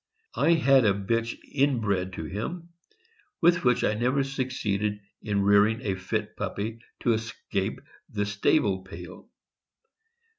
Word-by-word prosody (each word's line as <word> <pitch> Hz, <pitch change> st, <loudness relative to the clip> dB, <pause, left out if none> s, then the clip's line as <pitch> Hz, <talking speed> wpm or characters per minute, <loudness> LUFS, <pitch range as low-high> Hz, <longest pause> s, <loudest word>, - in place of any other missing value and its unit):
I 170 Hz, -, +3 dB
had 135 Hz, -5 st, +5 dB
a 100 Hz, -3 st, +3 dB
bitch 115 Hz, +4 st, -1 dB
inbred 110 Hz, -10 st, +1 dB
to 80 Hz, -, -5 dB
him, 165 Hz, -, -5 dB, 0.7 s
with 175 Hz, +1 st, +4 dB
which 125 Hz, -2 st, +3 dB
I -, -, +2 dB
never 125 Hz, +5 st, +1 dB
succeeded 105 Hz, -6 st, -2 dB, 0.2 s
in 100 Hz, -2 st, 0 dB
rear 100 Hz, +1 st, +6 dB
ing 110 Hz, +2 st, -2 dB
a 100 Hz, -, 0 dB
fit 95 Hz, 0 st, -3 dB
puppy 110 Hz, +3 st, -4 dB, 0.2 s
to 120 Hz, -, +3 dB
escape 110 Hz, 0 st, -3 dB, 0.3 s
the 105 Hz, -1 st, -1 dB
stable 100 Hz, 0 st, +2 dB
pail. 90 Hz, -, -11 dB
110 Hz, 135 wpm, -27 LUFS, 100-130 Hz, 0.7 s, rear